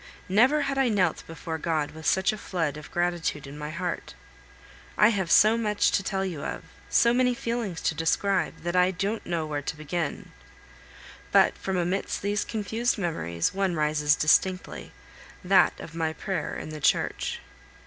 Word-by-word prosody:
Never 250 +10 +4
had 275 -1 -1
I 265 -2 +3
knelt 200 -4 +1
before 160 0 -6
God 155 -2 -1
with 160 0 -7
such 190 +2 +3
a - - -6
flood 165 -8 -2
of 150 -1 -10
gratitude 175 -4 -1
in 140 +1 -9
my 150 0 -6
heart. 175 +2 -4 0.8
I 210 - +6
have 190 -6 -1
so 220 +5 +6
much 210 -2 +1
to - - +2
tell 195 0 -2
you 170 -6 -4
of, - - -5 0.3
so 235 0 +4
many 250 0 +2
feelings 230 -8 -3
to - - 0
describe, 165 +5 0
that 175 +1 -2
I 180 0 +5
don't 200 +4 -2
know 170 -2 -1
where 150 -1 -3
to 150 - -5
begin; 155 +1 -4 1.0
but - - +5
from 190 -1 -3
amidst 180 +3 -2
these 205 +1 0
confused 225 +2 -1
memories, 85 - -1
one 190 -2 0
rises 150 -1 +2
distinctly, 185 +4 +1 0.5
that 185 +1 +4
of 160 - -9
my 160 -1 -1
prayer 190 +3 -3
in - - -7
the 155 -1 -7
church. - - 0
180 Hz, 170 wpm, -26 LUFS, 160-205 Hz, 1.0 s, I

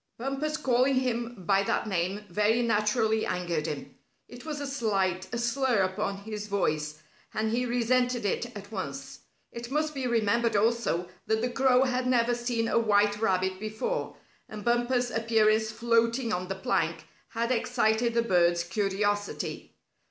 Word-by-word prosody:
Bumper's 275 +5 -2
calling 260 +1 +2
him 240 -5 -2
by 195 +1 +3
that 200 - 0
name 195 +1 -2
very 215 +4 +2
naturally 220 0 +1
angered 175 -3 -2
him. 150 -3 -5 0.3
It 245 +2 -12
was 305 -2 -4
a 285 - -4
slight, 195 -9 -1
a 235 - -2
slur 235 -2 +1
upon 195 +1 -2
his 210 -1 -5
voice, 155 -6 -1 0.3
and 220 0 0
he 250 +2 0
resented 245 0 +1
it 220 +4 0
at 200 +1 -11
once. 140 -9 -6 0.3
It 235 0 -7
must 305 +2 0
be 265 -3 -2
remembered 230 0 +1
also 215 -5 +1 0.2
that 220 0 +1
the 245 +1 -1
crow 260 0 +4
had 255 -1 0
never 245 -1 +3
seen 240 -1 -1
a - - +2
white 210 -1 +2
rabbit 185 -3 +1
before, 215 - -3 0.3
and 210 -1 -8
Bumper's 240 +1 +1
appearance 220 -1 +2
floating 230 +1 +1
on 180 +1 -2
the 195 - -3
plank - - -1 0.2
had 235 +1 -2
excited 235 -1 +1
the 235 - +3
bird's 175 -4 +3
curiosity. 205 +2 -2
225 Hz, 155 wpm, -28 LUFS, 200-245 Hz, 0.3 s, crow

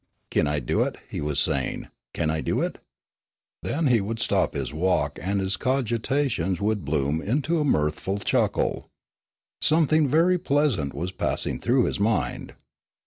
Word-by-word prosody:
"Kin 75 - +2
I 75 0 0
do 65 - 0
it?" - - -1
he - - -3
was 75 -1 -1
saying. 70 -3 -1 0.3
"Kin 80 -2 0
I 80 0 -1
do - - 0
it?" - - -2 0.8
Then 160 +2 -1
he 120 -5 +4
would 110 +4 -3
stop - - +1
his - - -3
walk 80 -3 0
and 100 +2 -1
his 95 0 -1
cogitations 125 - 0
would 105 -1 0
bloom 75 +1 0
into 145 - 0
a - - +2
mirthful 75 - 0
chuckle. 100 - 0 0.7
Something 155 -1 +3
very 170 +6 +3
pleasant 135 - +1
was 90 +2 -3
passing 95 - -1
through 125 +1 +2
his - - -1
mind. 105 +1 -1
100 Hz, 155 wpm, -25 LUFS, -, 0.8 s, he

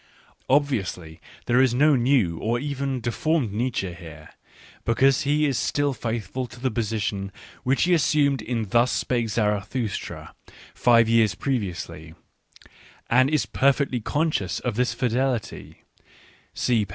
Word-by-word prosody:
Obviously 100 - 0 0.2
there 125 +2 +3
is 130 -2 +3
no 150 +3 +4
new 120 -10 +2
or 115 +2 0
even 140 -1 -3
deformed 125 0 -1
Nietzsche 110 -5 -2
here, 85 -2 -12 0.5
because 130 +3 +3
he 150 +1 +3
is 135 -5 0
still 145 -1 0
faithful 115 +1 -4
to 120 +1 -14
the 130 0 -1
position 105 -3 -2 0.3
which 130 +2 +1
he 180 - +3
assumed 145 -5 +2
in 115 -2 -3
Thus 120 +4 +3
spake 120 -3 -1
Zarathustra, 105 +1 -2 0.4
five 115 -2 +4
years 110 -5 +3
previously, 90 - -4 1.0
and 130 +3 +5
is 155 -1 +1
per 140 +1 +3
fectly 130 -5 -2
conscious 145 - -1
of 120 - -2
this 125 +1 +1
fidelity 125 -1 -2 0.7
(see 115 -4 +1
p. 100 - -8
120 Hz, 135 wpm, -24 LUFS, 105-135 Hz, 1.0 s, and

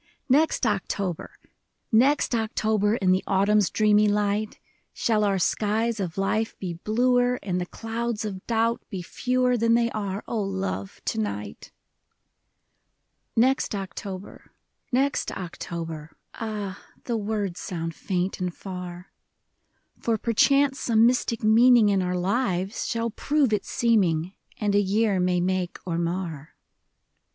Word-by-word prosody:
Next 290 0 +3
October, 195 -4 -2 0.5
Next 260 +5 +3
October, 215 -2 +1
In 190 -5 +2
the 185 +1 +2
autumn's 200 +1 +3
dreamy 210 -1 +4
light. 205 +1 0 0.3
Shall 215 -2 +1
our 200 -2 +2
skies 220 +4 0
of 180 -3 -3
life 215 +3 0
be 180 -3 -4
bluer, 245 +6 +2
And 180 -2 -1
the 180 - -4
clouds 225 0 -3
of 190 -3 -5
doubt 230 0 +1
be 190 -5 -5
fewer 250 +6 +1
Than 230 0 +3
they 235 0 +2
are, 200 -1 -3
O 225 - -1
love, 190 - -4
to - - -1
night! 105 -1 -5 1.6
Next 255 -1 +2
October, 195 0 -7 0.4
next 270 +2 +1
October, 165 -3 -6
— - - -49
Ah, 210 -3 -5 0.2
the 240 - -2
words 205 -4 -2
sound 165 -2 -4
faint 185 +2 -2
and 180 -1 -1
far; 180 -1 -8 0.9
For 230 -1 0
perchance 275 +5 +3
some 225 -1 +4
mystic 240 -2 +1
meaning 230 0 +6
In 195 -2 +2
our 180 0 -1
lives 190 0 -1
shall 230 0 -1
prove 280 -1 +1
its 210 - -1
seeming, 185 -7 +2 0.2
And 205 -2 0
a 205 - +4
year 205 0 +1
may 180 0 +2
make 185 -1 -1
or 170 -2 -2
mar. 170 -4 -4
205 Hz, 135 wpm, -25 LUFS, 185-230 Hz, 1.6 s, meaning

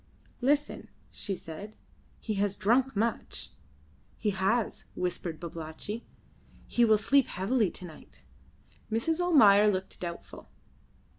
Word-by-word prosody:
"Listen," 290 +3 0 0.2
she 195 - -3
said. 190 +6 -9 0.4
"He 220 - -3
has 200 -1 0
drunk 245 +5 +2
much." 225 +3 -2 0.7
"He 210 - 0
has," 195 +4 0
whispered 175 -3 -3
Babalatchi. 170 +7 -6 0.6
"He 240 - +2
will 220 -2 +6
sleep 270 +6 +3
heavily 210 +2 +1
to 180 - -6
night." 160 -3 -14 0.7
Mrs. 315 +10 0
Almayer 215 - +6
looked 190 -1 -4
doubtful. 170 -1 -7
210 Hz, 115 wpm, -29 LUFS, 185-240 Hz, 0.7 s, will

